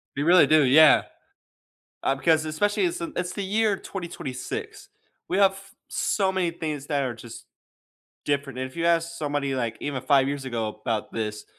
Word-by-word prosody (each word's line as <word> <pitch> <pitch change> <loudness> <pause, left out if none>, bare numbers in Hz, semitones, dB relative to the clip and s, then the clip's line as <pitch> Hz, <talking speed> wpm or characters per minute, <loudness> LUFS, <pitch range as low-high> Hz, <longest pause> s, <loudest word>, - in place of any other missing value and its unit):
You 145 - -1
really 175 -3 +6
do, 155 0 +5
yeah. 145 +4 +6 1.0
Um, 135 - 0
because 160 +2 +3
especially 205 - 0
it's, 350 0 -1
um 335 -2 -5
it's 180 0 -2
the 200 - -4
year 210 +1 +1
2026. 170 -10 -6 0.4
We 185 - 0
have 195 -1 +4 0.3
so 195 -2 0
many 185 -2 0
things 155 -4 -5
that 145 -2 0
are 125 -3 -2
just 115 0 -11 0.8
different. 140 -3 -2
And 130 0 -4
if - - -18
you 165 - -2
ask 170 0 +1
somebody, 145 -2 -2
like, 120 -3 -2
even 140 -3 -3
5 135 0 +3
years 140 -1 -4
ago 115 -4 -2
about 110 0 -4
this, 105 -2 -4
150 Hz, 175 wpm, -25 LUFS, 130-180 Hz, 1.0 s, really